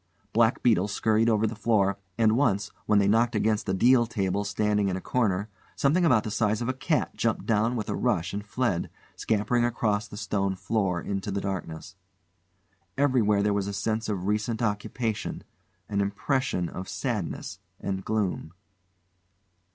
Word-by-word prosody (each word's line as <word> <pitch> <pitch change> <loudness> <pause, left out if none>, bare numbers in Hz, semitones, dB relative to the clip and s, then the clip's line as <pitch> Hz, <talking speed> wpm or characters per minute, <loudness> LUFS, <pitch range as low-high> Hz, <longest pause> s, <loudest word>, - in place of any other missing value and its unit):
Black 115 +1 +3
beetles 105 -4 +3
scurried 110 +2 +2
over 110 -1 +2
the 110 +1 -2
floor, 100 -3 +1 0.2
and 110 -1 +4
once, 110 -6 +1 0.2
when 105 - +4
they 100 -1 +4
knocked 115 +3 +3
against 105 -1 +1
a - - +1
deal 120 +3 +4
table 100 -3 -1
standing 105 0 +1
in 95 - -1
a - - -4
corner, 105 -2 0 0.3
something 155 +6 +2
about 130 -10 +4
the 110 - -4
size 110 0 +1
of 120 - -3
a 130 - 0
cat 150 +4 -1
jumped 115 -1 -1
down 115 +2 +2
with 110 -4 -3
a - - -2
rush 85 +1 0
and 100 +1 -3
fled, 105 -4 -1 0.3
scampering 115 +3 +1
across 105 -3 0
the 105 - -10
stone 100 -2 -1
floor 95 -3 -1
into 100 +2 -4
the 100 0 -1
darkness. 95 -5 -5 1.0
Everywhere 115 -8 +3
there 105 0 +2
was 100 -1 -1
a 100 - -3
sense 110 +3 -2
of 95 -3 -2
recent 105 +3 -1
occupation, 105 +1 -2 0.4
an 100 -1 0
impression 100 -2 -1
of 95 +2 -7
sadness - - -3 0.2
and 95 -1 -3
gloom. 100 -7 -2
105 Hz, 165 wpm, -27 LUFS, 100-115 Hz, 1.0 s, and